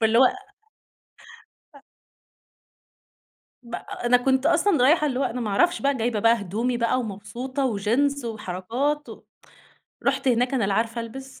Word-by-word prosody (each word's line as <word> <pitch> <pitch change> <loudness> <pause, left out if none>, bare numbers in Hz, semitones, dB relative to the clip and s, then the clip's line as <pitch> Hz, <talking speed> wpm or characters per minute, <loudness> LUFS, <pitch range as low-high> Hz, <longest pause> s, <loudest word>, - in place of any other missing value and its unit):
فاللي 225 +1 +3
هو 260 - +7 1.5
أ 280 - -16 1.8
ب 235 0 -6
أ - - -8
أنا 250 +1 +5
كنت 265 +2 +1
أصلًا 335 -4 +3
رايحة، 305 +2 +4
اللي 260 -2 -2
هو - - +1
أنا 250 -1 -2
ما 215 - -2
أعرفش 345 - +2
بقى 280 0 +1
جايبة 225 -2 -1
بقى 230 0 +3
هدومي 230 +6 -2
بقى 235 +2 +1
ومبسوطة 245 +6 -4
وجينز 250 +5 0
وحركات 230 +8 -3
و - - -10 0.9
رُحت 265 - +1
هناك، 245 +2 +2
أنا 245 -6 +1
لا 195 0 0
عارفة 230 +2 -1
ألبِس 265 +4 -9
245 Hz, 155 wpm, -24 LUFS, 225-270 Hz, 1.8 s, هو